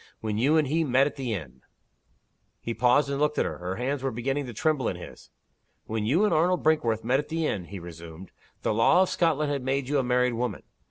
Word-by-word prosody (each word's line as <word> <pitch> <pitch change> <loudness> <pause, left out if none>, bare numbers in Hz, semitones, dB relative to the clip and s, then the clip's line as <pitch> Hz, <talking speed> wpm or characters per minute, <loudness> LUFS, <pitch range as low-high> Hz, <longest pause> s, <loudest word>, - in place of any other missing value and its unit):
When 110 -1 -2
you 145 +7 +3
and 155 -3 +2
he 160 +4 +1
met 135 -1 +3
at 145 - -3
the 130 -4 -4
inn 65 -8 -9 0.5
" - - -45
He 115 - -2
paused, 125 +5 +3
and 140 0 -2
looked 150 0 +1
at - - +2
her. - - -4
Her 90 +1 -4
hands 130 +4 -2
were 135 - -1
beginning 135 +4 -2
to - - -6
tremble 140 +2 0
in - - -1
his. 90 - -11 0.6
"When 110 -1 -2
you 170 - +3
and 210 - +1
Arnold 175 +3 +2
Brinkworth 125 -9 +2
met 130 +3 +2
at 150 - -5
the 165 0 -1
inn," 95 - -2
he 100 +3 -8
resumed, 85 0 -10 0.3
"the - - +1
law 115 - +5
of 190 - -2
Scotland 155 -3 +1
had 140 -2 -1
made 135 +1 -1
you 145 -1 +2
a - - +1
married 125 0 +2
woman. 115 -3 -3
130 Hz, 240 wpm, -27 LUFS, 110-150 Hz, 0.6 s, law